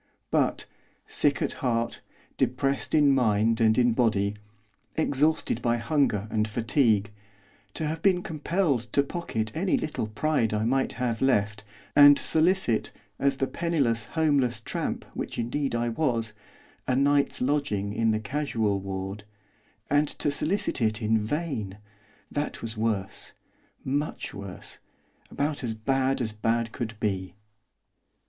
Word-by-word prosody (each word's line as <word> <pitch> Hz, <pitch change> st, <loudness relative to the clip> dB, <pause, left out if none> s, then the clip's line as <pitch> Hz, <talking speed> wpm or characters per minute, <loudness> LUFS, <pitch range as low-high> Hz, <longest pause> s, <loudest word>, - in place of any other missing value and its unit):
But, -, -, +1 dB, 0.4 s
sick 145 Hz, -1 st, +1 dB
at -, -, -1 dB
heart, 120 Hz, -2 st, -1 dB, 0.3 s
depressed 135 Hz, +4 st, 0 dB
in 145 Hz, -2 st, +5 dB
mind 115 Hz, -2 st, +2 dB
and 110 Hz, -1 st, +4 dB
in 120 Hz, -2 st, +4 dB
body, 105 Hz, -4 st, +2 dB, 0.6 s
exhausted 150 Hz, -4 st, +1 dB
by 120 Hz, 0 st, +1 dB
hunger 120 Hz, -5 st, +1 dB
and 110 Hz, 0 st, +1 dB
fatigue, 110 Hz, -1 st, +2 dB, 0.6 s
to 160 Hz, -, -2 dB
have 155 Hz, +1 st, -3 dB
been 185 Hz, -2 st, +3 dB
compelled 150 Hz, -, -1 dB
to 140 Hz, -, +4 dB
pocket 115 Hz, -9 st, -3 dB
any 185 Hz, +4 st, +1 dB
little 150 Hz, -8 st, -3 dB
pride 115 Hz, -1 st, 0 dB
I 105 Hz, -, 0 dB
might 130 Hz, +3 st, +1 dB
have 120 Hz, -2 st, -2 dB
left, 105 Hz, -5 st, +1 dB, 0.3 s
and 145 Hz, -1 st, +9 dB
solicit, 160 Hz, -, +2 dB, 0.3 s
as 140 Hz, -1 st, +2 dB
the 135 Hz, -, +1 dB
penniless, 135 Hz, -9 st, 0 dB
homeless 140 Hz, -7 st, +2 dB
tramp 110 Hz, -, -3 dB
which -, -, -5 dB
indeed 120 Hz, +3 st, -1 dB
I 120 Hz, 0 st, 0 dB
was, 115 Hz, -4 st, -1 dB, 0.5 s
a 130 Hz, -, +2 dB
night's 140 Hz, +1 st, +2 dB
lodging 125 Hz, -8 st, 0 dB
in 115 Hz, +1 st, +1 dB
the 110 Hz, 0 st, +1 dB
casual 110 Hz, -4 st, -1 dB
ward, 95 Hz, +1 st, -5 dB, 0.6 s
and 145 Hz, +1 st, +3 dB
to 145 Hz, -, -1 dB
solicit 160 Hz, +1 st, 0 dB
it 110 Hz, -1 st, +1 dB
in 110 Hz, +1 st, +3 dB
vain! 110 Hz, -, -3 dB, 0.5 s
that 145 Hz, -4 st, -3 dB
was 115 Hz, 0 st, -4 dB
worse. 110 Hz, -3 st, -2 dB, 0.5 s
Much 145 Hz, +4 st, -2 dB
worse. 100 Hz, -2 st, -6 dB, 0.5 s
About 145 Hz, 0 st, -1 dB
as 115 Hz, -2 st, -2 dB
bad 135 Hz, +4 st, 0 dB
as 110 Hz, -3 st, -1 dB
bad 115 Hz, +2 st, 0 dB
could 115 Hz, -3 st, -5 dB
be. 95 Hz, -4 st, -2 dB
120 Hz, 135 wpm, -27 LUFS, 110-145 Hz, 0.6 s, and